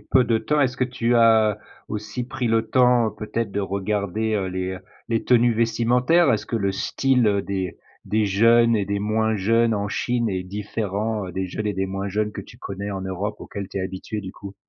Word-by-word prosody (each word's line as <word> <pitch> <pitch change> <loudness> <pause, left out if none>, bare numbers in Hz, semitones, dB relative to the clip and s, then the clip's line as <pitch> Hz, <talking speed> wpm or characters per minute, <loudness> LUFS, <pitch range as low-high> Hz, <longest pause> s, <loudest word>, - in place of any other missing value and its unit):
peu 130 -2 +3
de 115 -1 +2
temps. 145 +7 0
Est-ce 125 -2 +1
que 130 - +3
tu 120 -1 0
as 110 -2 +4 0.3
aussi 105 +3 -4
pris 130 -2 -3
le 115 0 +1
temps, 125 -3 +4
peut-être, 110 0 -4
de 100 - -1
regarder, 100 +2 -1
heu, 95 -2 0
les 95 0 -3
heu, 95 - -6 0.3
les 115 -1 0
tenues 120 -1 +4
vestimentaires? 125 +7 +3
Est-ce 110 - -1
que 115 - -2
le 100 -2 0
style 110 -1 +1
des 95 -2 -3 0.3
des 110 0 +1
jeunes 115 +3 +4
et 100 -2 -1
des 100 +1 -1
moins 110 +1 0
jeunes 115 +3 +2
en 100 0 -2
Chine 120 0 -1
est 95 -1 -2
différent 105 +1 -3
des 95 +2 -3
jeunes 105 +4 -4
et 105 - 0
des 95 0 -1
moins 95 +1 -4
jeunes 105 +2 -1
que - - -6
tu - - -13
connais 100 +1 -6
en 95 -1 -4
Europe? 95 +2 -3
Auxquels 100 -2 -6
tu 100 - -10
es 95 - 0
habituée, 95 +3 -5
du 95 -1 -7
coup. 100 -1 -10
105 Hz, 215 wpm, -23 LUFS, 100-115 Hz, 0.3 s, as